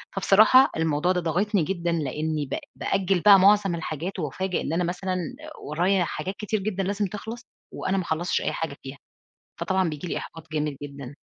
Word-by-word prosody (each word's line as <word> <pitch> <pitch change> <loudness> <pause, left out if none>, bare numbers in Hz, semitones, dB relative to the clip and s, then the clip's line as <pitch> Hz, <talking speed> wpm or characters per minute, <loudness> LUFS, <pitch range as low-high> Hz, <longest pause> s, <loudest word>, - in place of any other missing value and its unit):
فبصراحة 215 +7 +6
الموضوع 160 +2 +1
ده 180 -1 0
ضاغطني 180 +3 +1
جدًا، 175 -1 -2
لأني 155 0 -2
ب 135 - -4 0.2
بأجل 195 -1 0
بقى 200 -2 +8
معظم 195 -2 +4
الحاجات، 165 +3 -5
وأُفاجأ 180 +4 -2
إن 150 - -3
أنا 175 +2 +1
مثلًا 185 +2 -2 0.5
ورايا 180 +5 +1
حاجات 180 +4 -4
كتير 215 0 -2
جدًا 195 -1 -2
لازم 200 +2 -1
تخلص، 220 +5 -6 0.3
وأنا 190 +1 -1
ما 185 - 0
خلصتش 170 +2 -1
أي - - -1
حاجة 160 -3 -4
فيها، 135 +1 -8 0.6
فطبعًا 190 -2 +1
بييجي 150 +3 -6
لي - - -2
إحباط 160 -1 -9
جامد 150 -2 -1
جدًا. 140 -1 -8
180 Hz, 175 wpm, -25 LUFS, 155-195 Hz, 0.6 s, بقى